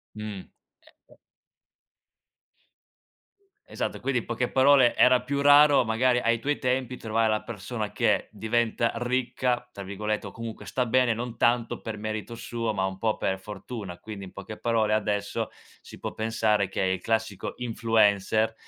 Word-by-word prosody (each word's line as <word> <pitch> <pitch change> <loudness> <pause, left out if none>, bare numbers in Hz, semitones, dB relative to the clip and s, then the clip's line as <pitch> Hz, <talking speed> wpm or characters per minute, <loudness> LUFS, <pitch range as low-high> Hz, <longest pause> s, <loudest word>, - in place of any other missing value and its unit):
Mh, 105 -3 -6 0.4
certo. - - -25 2.5
Esatto, - - -3
quindi 135 -3 0
in - - -9
poche 120 +1 -2
parole 135 -2 +5
era 125 0 +5
più 140 +2 -1
raro 145 -1 +7
magari 120 +2 +2
ai 115 0 +2
tuoi 145 +5 -2
tempi 125 -1 -1
trovare 110 0 0
la 110 - 0
persona 110 0 -5
che - - +1
diventa 115 +2 0
"ricca," 125 0 -1
tra 100 - -9
virgolette, 105 +2 -3
o - - -8
comunque 115 -1 -8
sta 125 -1 0
bene, 120 -1 +3
non 120 0 -5
tanto 120 0 +1
per 110 -2 -5
merito 110 +2 -5
suo, 115 -2 -3
ma 95 -1 +1
un 95 0 -4
po' 110 -1 0
per 95 0 -1
fortuna. 100 -2 -7
Quindi 100 +1 -8
in 90 - -11
poche 100 +2 -8
parole 110 -2 +1
adesso 105 -1 -1 0.3
si - - -12
può - - -5
pensare 110 -3 +1
che - - -5
è - - +2
il 95 0 0
classico 110 -3 -2
influencer, 110 -2 +2
115 Hz, 155 wpm, -27 LUFS, 105-125 Hz, 2.5 s, raro